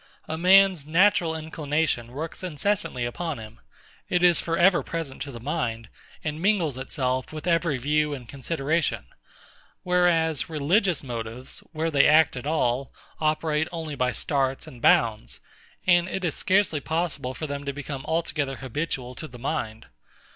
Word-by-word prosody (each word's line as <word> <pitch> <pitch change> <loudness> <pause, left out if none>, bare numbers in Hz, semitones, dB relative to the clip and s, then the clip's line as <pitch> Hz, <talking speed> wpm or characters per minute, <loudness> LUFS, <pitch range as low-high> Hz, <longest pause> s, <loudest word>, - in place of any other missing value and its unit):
A 160 - -3
man's 185 -2 +5
natural 170 0 +3
inclination 155 -5 -1
works 150 +7 -6
incessantly 180 -6 -1
upon 160 +5 -3
him; 110 0 -11 0.5
it 180 0 +1
is 175 -1 +6
for 165 0 -1
ever 180 0 +5
present 165 -5 -5
to 140 - -4
the 120 - -8
mind, 115 -5 -3 0.3
and 150 0 -3
mingles 180 -8 +2
itself 130 -1 -2
with 155 0 -7
every 165 -4 +2
view 150 +3 +1
and 130 -4 -6
consideration: 145 - -1 0.8
whereas 170 -5 +2
religious 165 +3 +1
motives, 120 0 -6
where 165 0 -1
they 140 -2 +5
act 155 0 +5
at 125 +2 -5
all, 135 -4 0 0.3
operate 155 0 +1
only 160 -3 -5
by 125 -2 0
starts 135 0 -1
and 120 - -12
bounds; 110 -2 +2 0.5
and 175 -1 +4
it 190 -1 -3
is 160 - 0
scarcely 190 -5 +2
possible 150 -4 -2
for 155 - -4
them 140 -1 -4
to 140 - -1
become 140 -1 -6
altogether 155 -4 -1
habitual 130 -1 -4
to 155 - -7
the 125 - -12
mind. 120 -4 -3
150 Hz, 155 wpm, -25 LUFS, 130-165 Hz, 0.8 s, is